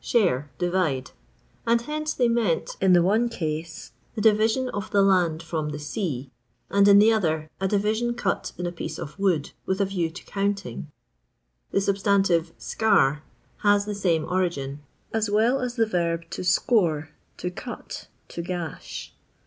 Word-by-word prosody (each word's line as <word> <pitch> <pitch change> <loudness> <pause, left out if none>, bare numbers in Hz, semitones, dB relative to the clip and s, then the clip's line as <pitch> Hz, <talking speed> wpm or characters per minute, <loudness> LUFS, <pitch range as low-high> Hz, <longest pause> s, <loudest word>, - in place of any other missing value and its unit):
share, 170 - +2
divide; 175 -8 0 0.6
and 235 0 +3
hence 305 +3 -3
they 245 - +3
meant, 230 -8 0
in 190 -1 +5
the 175 -1 +6
one 220 +6 +2
rase, 160 0 -4 0.2
the 215 - -2
division 220 +4 +3
of 205 -5 -4
the 200 -1 +4
land 175 -5 +3
ttom 160 -2 -3
the 150 - -4
sea; 145 - -4 0.4
and 200 0 +5
in 200 0 +8
the 215 +2 +6
other, 160 -7 0
a 190 - +1
division 215 +4 0
cut 195 -4 -1
in 180 - -3
a 175 - -2
piece 160 -2 -6
of 150 +6 -8
wood, 180 -7 +1 0.2
with 190 +1 0
a 200 - +3
view 180 -4 -1
to 165 - -11
counting. 200 -5 -2 0.8
The 195 - +1
substantive 195 -4 +2
eear 150 -10 +2 0.4
has 205 -1 +3
the 210 - -3
same 175 -6 +1
origin; 165 -7 -1 0.3
as 220 -1 0
well 230 +6 +3
as 245 -1 -3
the 230 -2 +3
verb 170 -4 -1
to - - -4
score, 175 -5 +2 0.3
to 180 - -3
cut, 240 +6 -8 0.2
to 170 - -5
gash. 175 -2 -6
190 Hz, 165 wpm, -25 LUFS, 165-210 Hz, 0.8 s, in